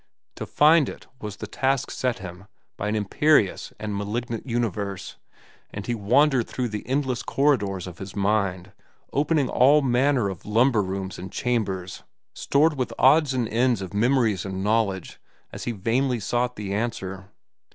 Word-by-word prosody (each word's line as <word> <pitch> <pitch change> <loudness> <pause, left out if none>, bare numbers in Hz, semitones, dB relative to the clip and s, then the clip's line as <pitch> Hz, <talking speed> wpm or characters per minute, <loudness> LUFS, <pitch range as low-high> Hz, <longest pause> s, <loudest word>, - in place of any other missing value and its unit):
To - - -5
find 150 -1 +4
it - - -10
was 105 -4 -6
the - - -7
task 135 -1 -1
set 125 -4 -1
him 95 0 -10 0.3
by 105 - -4
an 105 - 0
imperious 110 +2 +2
and 105 -1 -4
malignant 115 +4 -4
universe, 105 -5 -3 0.5
and 100 - -6
he 120 - -1
wandered 125 +4 +3
through 125 -2 -3
the 105 -1 -6
endless 130 -2 -1
corridors 105 - +1
of 90 -2 -10
his 95 -1 -8
mind, 100 -2 0 0.4
opening 145 -1 +2
all 140 +5 +4
manner 130 -2 +2
of 95 -4 -6
lumber 115 +2 +3
rooms 95 0 -4
and 95 +2 -8
chambers 100 -7 -2 0.3
stored 150 +1 +2
with 130 - -2
odds 140 0 +4
and 120 -3 0
ends 120 0 +2
of 95 -1 -7
memories 110 -3 +2
and 95 -1 -4
knowledge 105 -4 0 0.3
as - - -7
he 120 - -1
vainly 120 +4 0
sought 120 +3 -1
the 100 -2 -4
answer. 95 -3 -4
115 Hz, 160 wpm, -24 LUFS, 100-130 Hz, 0.5 s, find